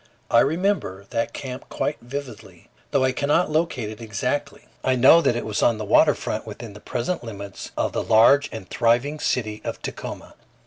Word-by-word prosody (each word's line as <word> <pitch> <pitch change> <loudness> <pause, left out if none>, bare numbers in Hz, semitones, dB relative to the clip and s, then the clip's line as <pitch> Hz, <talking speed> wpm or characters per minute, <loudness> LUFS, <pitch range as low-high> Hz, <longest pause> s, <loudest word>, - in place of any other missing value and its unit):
I 115 - +6
remember 155 - 0
that 115 - -1
camp 130 -2 -7
quite 150 - -2
vividly; 125 -3 -8 0.2
though 140 - +2
I 130 - +3
cannot 150 +6 +1
locate 150 -9 -1
it 110 - -10
exactly, 115 +6 -3 0.2
I 130 - +2
know 130 +7 +7
that 120 - +2
it 120 - -3
was 105 -1 -2
on 115 - +3
the 105 - -4
water - - +5
front - - -4
within 115 -3 -8
the 105 - -11
present 125 - -3
limits 100 -3 -8
of - - 0
the - - 0
large 130 +6 +5
and 105 -4 -8
thriving 125 +6 +1
city 110 -6 -1
of - - -4
Tacoma. - - -7
120 Hz, 185 wpm, -23 LUFS, 110-145 Hz, 0.2 s, know